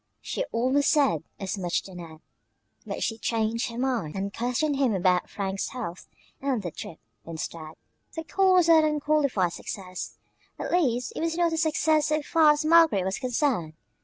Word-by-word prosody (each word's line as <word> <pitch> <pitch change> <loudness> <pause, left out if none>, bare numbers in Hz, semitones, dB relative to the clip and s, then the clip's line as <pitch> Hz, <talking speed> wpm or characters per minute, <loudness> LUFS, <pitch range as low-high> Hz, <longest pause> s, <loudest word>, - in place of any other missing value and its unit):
She - - -3
almost 260 +5 +2
said 275 - +3 0.2
as 195 0 -4
much 175 -2 -1
to 190 - -12
Ned, 165 -3 -10 0.7
but - - -3
she 225 0 -2
changed 230 +1 -1
her 230 - -8
mind 245 -11 -1
and 195 +1 -3
questioned 250 +5 -1
him 260 -6 +2
about 180 -1 +2
Frank's 195 -1 -3
health 215 -9 -7 0.3
and 265 -6 -1
their 175 - -4
trip, 155 - -8 0.3
instead. 160 -1 -6 0.4
The 325 - -4
call 380 +3 +3
was 355 -2 +4
not 325 -2 +6
an 305 -1 +1
unqualified 285 - +1
success 185 -3 -7 0.4
at - - -4
least 250 -9 +1
it - - -4
was 330 0 -1
not 340 -1 +2
a - - -1
success 315 -1 +2
so 305 0 0
far 315 0 +5
as 300 +1 -3
Margaret 320 - +5
was 190 +1 -2
concerned. 250 - 0
245 Hz, 180 wpm, -26 LUFS, 190-305 Hz, 0.7 s, not